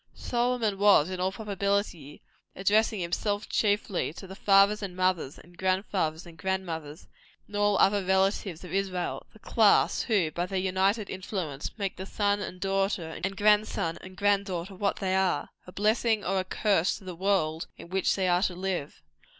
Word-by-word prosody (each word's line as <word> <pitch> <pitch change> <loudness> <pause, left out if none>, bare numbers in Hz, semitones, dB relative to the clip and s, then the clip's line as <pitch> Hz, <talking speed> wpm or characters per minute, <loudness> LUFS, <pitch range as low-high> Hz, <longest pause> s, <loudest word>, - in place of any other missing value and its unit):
Solomon 240 -4 -1
was, 195 -5 +5
in 185 - -4
all 185 +1 0
probability, 200 -7 -2 0.3
addressing 210 +2 +2
himself 205 +5 -2
chiefly 205 -5 0
to 190 - -10
the 190 - -9
fathers 200 +2 +4
and 190 -3 -5
mothers, 185 -6 0
and 175 +1 -17
grand 185 +2 0
fathers 160 -4 -2
and 170 -1 -13
grand 190 +2 -1
mothers, 160 -2 -7 0.4
and 205 - -11
other 205 -1 +3
relatives 190 -2 0
of 180 - -9
Israel; 190 -2 -2
the - - -17
class 215 -1 +3
who, 195 -9 +1
by 175 +3 -2
their 190 0 -3
united 190 +3 +1
influence, 185 -5 -5
make 195 -3 -3
the 190 - -6
son 205 0 0
and 185 -3 -6
daughter, 195 -3 0
and 195 +1 -2
grand 210 +1 +4
son 165 0 -3
and 185 0 -12
grand 200 0 +2
daughter, 180 +1 -4
what 200 +2 -1
they 190 -1 -1
are 185 -6 +1 0.2
a - - -9
blessing 215 +1 +1
or 190 +1 +1
a - - 0
curse 190 -1 +1
to 205 - -16
the 185 -1 -6
world 170 -3 0
in - - -11
which 190 +1 +1
they 190 -2 0
are 180 0 +3
to 185 -2 0
live. 180 -5 -4
190 Hz, 185 wpm, -28 LUFS, 180-205 Hz, 0.4 s, was